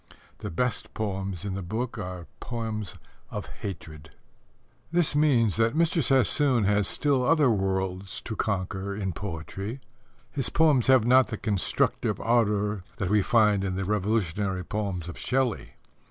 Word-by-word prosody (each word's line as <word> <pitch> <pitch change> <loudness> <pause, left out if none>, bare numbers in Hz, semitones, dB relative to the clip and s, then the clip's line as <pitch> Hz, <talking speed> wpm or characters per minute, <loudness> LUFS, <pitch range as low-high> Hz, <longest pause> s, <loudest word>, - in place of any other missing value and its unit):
The - - -5
best 125 +9 -2
poems 95 -4 -3
in 100 - -3
the 95 - -3
book 110 +6 -4
are 90 -3 -6
poems 110 -4 -4 0.3
of - - -5
hatred. 80 -5 -8 0.8
This 170 -4 +3
means 125 -9 +3
that 115 +3 +2
Mr. 165 +1 +2
Sassoon 130 -1 +3
has 105 0 +2
still 140 -4 +1
other 145 -1 +4
worlds 95 -2 -1
to 110 - -5
conquer 100 -1 -2
in 95 -3 -2
poetry. 95 - -5 0.5
His 135 -3 -1
poems 150 -6 +3
have 130 -4 +5
not 130 +1 +5
the 110 - -4
constructive 100 -3 0
ardour 105 -4 +1
that 95 0 -2
we 105 -1 +4
find 105 -2 +3
in 95 -1 -2
the 95 0 -2
revolutionary 100 -2 0
poems 100 -5 -3
of 85 - -8
Shelley. 130 -4 -1
105 Hz, 145 wpm, -27 LUFS, 95-125 Hz, 0.8 s, have